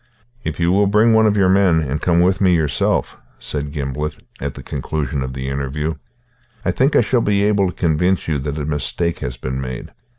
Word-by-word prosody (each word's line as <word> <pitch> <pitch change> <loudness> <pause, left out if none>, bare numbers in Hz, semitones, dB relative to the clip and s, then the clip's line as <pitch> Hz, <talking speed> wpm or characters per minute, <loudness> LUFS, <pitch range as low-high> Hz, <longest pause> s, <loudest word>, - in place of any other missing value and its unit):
"If 80 0 -4
you 85 +1 +2
will 100 +2 +3
bring 105 +3 +4
one 110 0 +5
of 105 0 +2
your 95 -2 +4
men, 95 -3 +4
and 70 0 -3
come 85 -1 +3
with 95 +2 +2
me 90 -2 +4
yourself," 75 -6 0 0.2
said 75 -1 -4
Gimblet, 75 0 -3 0.3
at - - -3
the - - -9
conclusion 70 0 -3
of 65 0 -4
the 65 0 -5
interview, 70 +3 -2 0.7
"I - - +2
think 135 +3 +2
I - - +6
shall 120 +1 +1
be 100 -2 +2
able 100 -2 +3
to - - -8
convince 90 +3 +1
you 75 -3 0
that 70 +2 -4
a 75 - -3
mistake 75 +3 -2
has 60 0 -5
been 65 +1 -4
made. 65 -2 -6
80 Hz, 210 wpm, -19 LUFS, 70-95 Hz, 0.7 s, I